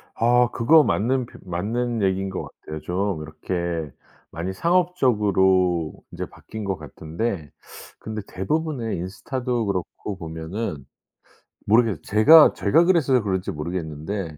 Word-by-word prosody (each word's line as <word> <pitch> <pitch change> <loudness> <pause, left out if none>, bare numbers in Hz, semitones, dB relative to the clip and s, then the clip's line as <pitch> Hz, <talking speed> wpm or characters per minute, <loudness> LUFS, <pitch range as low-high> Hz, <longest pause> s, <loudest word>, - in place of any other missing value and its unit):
아 120 +1 +3
그거 150 +7 +5
맞는 125 +2 +1
표 - - -15
맞는 110 +6 -2
얘기인 95 0 0
것 95 - -4 0.2
같아요. 75 0 -7
좀 95 -2 -2
이렇게 80 0 -4 0.4
많이 85 +4 -4
상업적으로 100 - +2 0.2
인제 - - -5
바뀐 110 -1 -9
것 95 -2 -2
같은데 80 - -4 0.5
근데 110 -1 -5
대부분의 125 - -2
인스타도 115 +7 -3
그렇고 100 +1 -4
보면은 80 -2 -5 0.8
모르겠 110 -6 +3
제가 150 +10 +7
제가 160 +12 +3
그래서 140 -9 +3
그런지 95 -2 -1
모르겠는데 80 +1 -5
100 Hz, 285 characters per minute, -23 LUFS, 85-120 Hz, 0.8 s, 제가